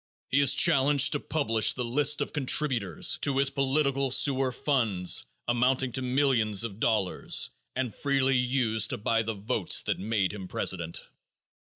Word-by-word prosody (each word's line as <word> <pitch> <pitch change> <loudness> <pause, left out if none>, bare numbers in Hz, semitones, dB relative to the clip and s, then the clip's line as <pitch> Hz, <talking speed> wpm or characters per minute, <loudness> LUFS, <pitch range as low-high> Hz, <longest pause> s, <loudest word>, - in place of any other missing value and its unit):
He 135 - +3
is 140 -2 +4
challenged 140 -3 +3
to 145 - 0
publish 115 -9 0
the 125 - -4
list 145 +5 +2
of - - -4
contributors 130 - 0
to 140 -2 -1
his 135 0 +3
political 140 0 0
sewer 135 0 +2
funds, 115 -10 0 0.2
amounting 125 +2 +1
to 130 - -2
millions 125 -6 +1
of 110 -3 -7
dollars, 110 -6 0 0.2
and 125 -4 -3
freely 135 -1 0
used 125 -4 +1
to 125 - -2
buy 115 +1 0
the 110 0 -4
votes 105 -1 0
that - - -2
made 100 -2 -1
him 95 -3 -8
president. 85 -2 -3
125 Hz, 155 wpm, -27 LUFS, 110-135 Hz, 0.2 s, is